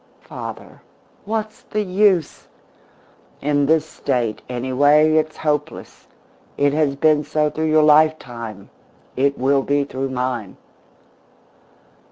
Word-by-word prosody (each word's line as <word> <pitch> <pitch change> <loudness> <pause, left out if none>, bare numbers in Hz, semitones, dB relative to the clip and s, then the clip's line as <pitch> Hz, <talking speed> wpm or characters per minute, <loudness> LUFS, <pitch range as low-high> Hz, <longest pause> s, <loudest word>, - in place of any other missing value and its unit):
Father, - - -9 0.4
what's 215 0 -4
the 215 0 -3
use? 190 -4 +1 0.9
In 145 -1 +1
this 160 0 +3
State, 120 -8 -2
anyway, 145 +5 +3
it's 155 0 0
hopeless. 150 -1 -4 0.5
It 145 0 +2
has 150 -2 +1
been 150 +1 +2
so 150 0 0
through 160 0 -2
your 155 0 +4
lifetime; 125 -9 +1 0.4
it 140 +2 +1
will 135 +2 +2
be 145 +1 0
through 135 -1 -4
mine." 125 -6 -4
145 Hz, 110 wpm, -20 LUFS, 130-155 Hz, 0.9 s, your